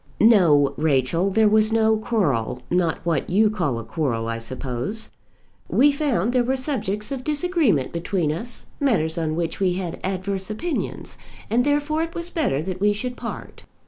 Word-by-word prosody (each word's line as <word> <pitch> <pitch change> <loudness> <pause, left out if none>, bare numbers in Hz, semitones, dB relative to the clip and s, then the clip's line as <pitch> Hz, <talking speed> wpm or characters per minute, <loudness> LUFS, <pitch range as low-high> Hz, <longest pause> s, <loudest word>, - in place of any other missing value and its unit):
"No, 165 -11 +5
Rachel, 155 +4 +1
there 215 +2 +3
was 215 +1 +4
no 220 -1 +3
quarrel; 145 - -1
not 175 -2 0
what 165 -5 0
you 210 +3 +3
call 170 - -1
a 115 - -5
quarrel, 120 -7 -2
I 115 0 -3
suppose. 130 - -4 0.6
We 290 +3 +5
found 255 - 0
there 250 -1 +3
were 260 +2 0
subjects 220 -6 -3
of 265 -2 -4
disagreement 300 - +1
between 170 -2 -1
us, 225 +10 -5
matters 170 - +1
on 155 -1 -1
which 165 -1 -2
we 185 -2 +2
had 180 -2 -4
adverse 190 +1 -3
opinions; 310 +10 -4 0.3
and 240 +2 +3
therefore 290 +2 +1
it 330 0 -4
was 340 +1 -5
better 205 - 0
that 185 +1 -5
we 205 0 +4
should 245 +4 -4
part." - - -8
200 Hz, 170 wpm, -23 LUFS, 160-245 Hz, 0.6 s, No